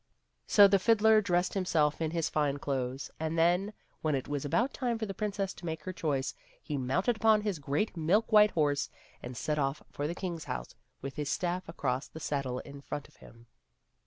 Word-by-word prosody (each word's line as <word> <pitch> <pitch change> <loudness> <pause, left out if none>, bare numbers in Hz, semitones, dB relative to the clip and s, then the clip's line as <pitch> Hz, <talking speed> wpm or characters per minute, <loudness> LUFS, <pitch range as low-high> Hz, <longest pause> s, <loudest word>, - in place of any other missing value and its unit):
So 205 -1 +8
the 195 0 +4
fiddler 220 +1 +5
dressed 180 -2 +1
himself 165 -6 +1
in 160 - +1
his 165 0 -1
fine 145 -2 0
clothes, 135 -1 -3
and 160 +1 -2
then, 175 +5 +3 0.3
when 155 -2 +1
it 130 - -3
was 145 -1 -2
about 235 - +1
time 245 -3 -1
for 220 - -2
the 195 - -5
princess 200 -1 -2
to - - -15
make 160 -1 -4
her 185 - -4
choice, 145 -6 -1 0.3
he 150 - -5
mounted 135 - 0
upon 220 -1 +4
his 205 -6 -2
great 145 +9 -1
milk 180 +8 +2
white 210 -1 +7
horse 145 -5 +1 0.3
and 125 0 -7
set 150 -1 -1
off 135 +1 -1
for 145 - -2
the 170 - -3
king's 175 -4 -4
house - - -5 0.3
with 135 0 -6
his 150 -2 -2
stafif 180 +4 -1
across 135 -5 -2
the 160 - -10
saddle 140 -5 -2
in 140 0 -11
front 145 0 -6
of - - -25
him. 115 0 -16
160 Hz, 205 wpm, -31 LUFS, 140-195 Hz, 0.3 s, So